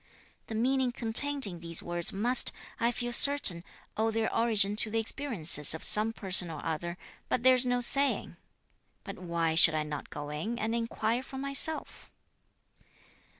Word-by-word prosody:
The 220 Hz, -, -8 dB
meaning 255 Hz, +2 st, -2 dB
contained 265 Hz, +4 st, +5 dB
in 175 Hz, -4 st, -9 dB
these 170 Hz, -1 st, -3 dB
words 175 Hz, 0 st, -1 dB
must, 235 Hz, +6 st, +1 dB, 0.3 s
I 235 Hz, +1 st, -1 dB
feel 240 Hz, 0 st, -6 dB
certain, 235 Hz, -11 st, +6 dB, 0.3 s
owe 220 Hz, +1 st, -2 dB
their 225 Hz, 0 st, -4 dB
origin 210 Hz, -3 st, 0 dB
to 220 Hz, -, +1 dB
the 225 Hz, -, -5 dB
experiences 195 Hz, -, +1 dB
of 160 Hz, -, -10 dB
some 215 Hz, +1 st, +4 dB
person 190 Hz, -5 st, 0 dB
or 155 Hz, -3 st, -10 dB
other; 170 Hz, +2 st, -6 dB, 0.3 s
but 245 Hz, -, -3 dB
there's 255 Hz, -1 st, +3 dB
no 245 Hz, 0 st, -2 dB
saying. 275 Hz, +3 st, 0 dB, 0.7 s
But 195 Hz, -3 st, -11 dB
why 170 Hz, -2 st, -4 dB
should 160 Hz, 0 st, +4 dB
I 155 Hz, -, -3 dB
not 150 Hz, -1 st, -9 dB
go 145 Hz, 0 st, -9 dB
in 190 Hz, +11 st, -7 dB
and 225 Hz, -1 st, -5 dB
inquire 230 Hz, 0 st, -4 dB
for 265 Hz, 0 st, -12 dB
myself?" 275 Hz, +3 st, -3 dB
220 Hz, 160 wpm, -27 LUFS, 170-245 Hz, 0.7 s, certain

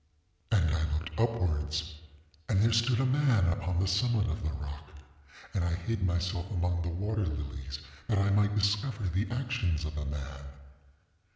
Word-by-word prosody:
ŌĆ£And 90 Hz, -9 st, +3 dB
I 80 Hz, -2 st, 0 dB
looked 80 Hz, +7 st, -4 dB
upwards, 85 Hz, -8 st, 0 dB, 0.6 s
and 95 Hz, -, +3 dB
there 115 Hz, +3 st, +4 dB
stood 115 Hz, +2 st, +3 dB
a 135 Hz, -, +3 dB
man 130 Hz, -7 st, +4 dB
upon 90 Hz, +1 st, -2 dB
the 95 Hz, -, +2 dB
summit 110 Hz, +2 st, +2 dB
of -, -, -4 dB
the 80 Hz, -, -1 dB
rock; 75 Hz, -1 st, -6 dB, 0.6 s
and 95 Hz, -, +1 dB
I 85 Hz, -1 st, +1 dB
hid 100 Hz, +4 st, -2 dB
myself 90 Hz, +1 st, 0 dB
among 90 Hz, -3 st, 0 dB
the 85 Hz, -, -2 dB
water 100 Hz, +5 st, -1 dB
lilies 70 Hz, -2 st, -4 dB, 0.3 s
that 110 Hz, -, +2 dB
I 100 Hz, 0 st, +3 dB
might 105 Hz, +1 st, +3 dB
discover 105 Hz, +3 st, +1 dB
the 95 Hz, +3 st, 0 dB
actions 120 Hz, -, -1 dB
of 75 Hz, -, -4 dB
the 75 Hz, -1 st, -4 dB
man. 70 Hz, -1 st, -5 dB
90 Hz, 170 wpm, -31 LUFS, 80-110 Hz, 0.6 s, there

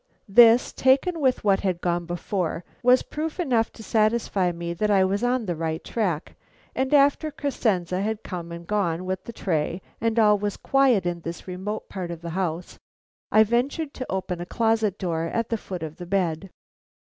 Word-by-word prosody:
This, 230 Hz, +3 st, +6 dB
taken 275 Hz, +7 st, +2 dB
with 260 Hz, -2 st, +2 dB
what 195 Hz, -2 st, +3 dB
had 185 Hz, -3 st, -1 dB
gone 175 Hz, -1 st, -1 dB
before, 175 Hz, 0 st, -2 dB, 0.2 s
was 250 Hz, +1 st, +5 dB
proof 315 Hz, +3 st, -5 dB
enough 245 Hz, -9 st, +1 dB
to 220 Hz, -, -11 dB
satisfy 215 Hz, -4 st, +1 dB
me 170 Hz, 0 st, -4 dB
that 210 Hz, +5 st, -1 dB
I 195 Hz, -2 st, +4 dB
was 200 Hz, +4 st, 0 dB
on 245 Hz, -1 st, +1 dB
the 175 Hz, -3 st, -2 dB
right 160 Hz, 0 st, -3 dB
track, 180 Hz, -9 st, -2 dB, 0.4 s
and 265 Hz, 0 st, -1 dB
after 285 Hz, +2 st, +4 dB
Crescenze 220 Hz, -, -1 dB
had 205 Hz, +4 st, -2 dB
come 170 Hz, -2 st, -6 dB
and 170 Hz, 0 st, -8 dB
gone 180 Hz, -3 st, -1 dB
with 185 Hz, 0 st, -3 dB
the -, -, -6 dB
tray 170 Hz, -5 st, -1 dB, 0.2 s
and 230 Hz, 0 st, 0 dB
all 210 Hz, -2 st, +5 dB
was 205 Hz, 0 st, -2 dB
quiet 265 Hz, -8 st, +3 dB
in 175 Hz, -1 st, -2 dB
this 170 Hz, +3 st, -7 dB
remote 190 Hz, +4 st, -5 dB
part 185 Hz, -3 st, -5 dB
of 170 Hz, -1 st, -6 dB
the 170 Hz, -, -5 dB
house, 175 Hz, -1 st, -3 dB, 0.5 s
I 215 Hz, -, +7 dB
ventured 270 Hz, +7 st, -1 dB
to 255 Hz, -, -6 dB
open 185 Hz, -2 st, -3 dB
a -, -, -4 dB
closet 220 Hz, -3 st, +1 dB
door 165 Hz, -3 st, -2 dB
at 230 Hz, +7 st, -2 dB
the 230 Hz, -, +1 dB
foot 180 Hz, -5 st, -6 dB
of 155 Hz, -1 st, -7 dB
the 175 Hz, -, -8 dB
bed. 185 Hz, -1 st, -1 dB
195 Hz, 190 wpm, -25 LUFS, 175-230 Hz, 0.5 s, I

